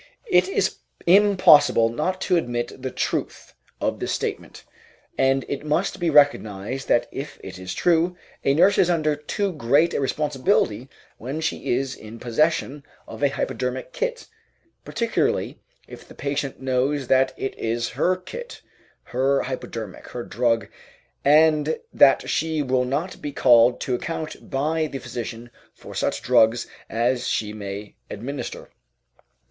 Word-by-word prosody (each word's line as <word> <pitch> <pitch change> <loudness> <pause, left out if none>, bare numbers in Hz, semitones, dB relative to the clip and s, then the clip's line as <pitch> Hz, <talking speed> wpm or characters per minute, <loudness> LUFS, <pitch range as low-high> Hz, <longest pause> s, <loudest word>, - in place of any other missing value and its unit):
It 370 - +5
is 390 - 0 0.3
impossible 185 - +6
not 170 +10 -2
to 185 - +2
admit 120 -5 -2
the 130 - -3
truth - - -3 0.3
of - - -1
this - - -2
statement, - - -4 0.5
and 135 0 +2
it 140 0 -4
must 155 +6 -1
be 175 -1 +1
recognized 130 -5 +2
that 120 0 +2
if 140 +2 -7
it 95 -1 -8
is 90 0 -6
true, 175 +1 +2 0.3
a 135 - +3
nurse 190 +6 +4
is 180 - +4
under 155 -3 +1
too 190 +6 -2
great 150 +4 +2
a - - 0
responsibility 135 - 0 0.3
when 135 +7 -4
she 160 -6 -1
is 135 +1 -2
in 110 +2 -11
possession 145 +3 0 0.2
of - - -9
a 140 - +4
hypodermic 130 -1 -3
kit, - - -3 0.6
particularly 230 -1 -1 0.3
if - - -12
the - - -14
patient 140 -1 -3
knows 135 +2 0
that 130 0 +3
it 135 - -4
is 115 +1 -1
her 185 - +1
kit, 485 - -9 0.4
her 135 +2 +1
hypodermic, 115 -6 -6
her 120 - -6
drug, 115 -2 0 0.6
and 155 +1 +4
that 135 -1 +5
she 160 -1 0
will 130 -1 +1
not 150 +8 -3
be 145 - -4
called 120 -2 +5
to 130 - -2
account 160 +5 -5
by 155 +4 0
the 140 - -6
physician 120 -1 -7 0.2
for - - -12
such - - -2
drugs 115 +2 +4 0.2
as 120 +2 0
she 105 -1 -1
may 100 0 -7 0.2
administer. 130 +7 -6
135 Hz, 145 wpm, -23 LUFS, 120-160 Hz, 0.6 s, impossible